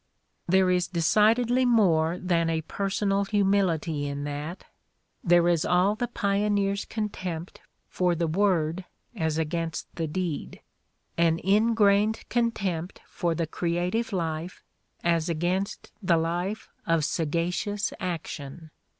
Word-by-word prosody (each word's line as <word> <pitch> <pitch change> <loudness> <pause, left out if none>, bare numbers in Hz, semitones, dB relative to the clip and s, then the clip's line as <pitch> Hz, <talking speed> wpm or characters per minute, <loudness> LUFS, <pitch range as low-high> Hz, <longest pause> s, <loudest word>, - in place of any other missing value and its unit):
There 185 +1 +4
is 180 0 +1
decid 210 +6 +4
edly 245 +1 +1
more 180 -9 +3
than 170 -2 +1
a 160 -1 0
personal 195 +3 -1
humility 190 -7 +1
in 140 0 -4
that, 145 +4 -5 0.6
there 175 -1 +4
is 170 -2 +2
all 180 +3 +3
the 240 +3 -2
pioneer 200 -1 +1
's 200 - -4
contempt 185 -6 -5 0.3
for 180 -1 +1
the 170 0 0
word 175 -1 +1 0.3
as 160 -5 -1
against 165 +1 -3
the 165 -2 -1
deed, 170 -1 -4 0.6
an 165 -1 +4
ingrained 210 +1 +3
contempt 195 -8 -1
for 170 -2 -2
the 165 - 0
creative 175 +8 -1
life 165 -1 -3 0.4
as 170 -1 +1
against 180 +5 -2
the 180 -4 +3
life 175 +6 -2 0.2
of 165 -3 +2
sagacious 170 +6 -1
atetion. 160 -3 -5
180 Hz, 125 wpm, -27 LUFS, 165-200 Hz, 0.6 s, There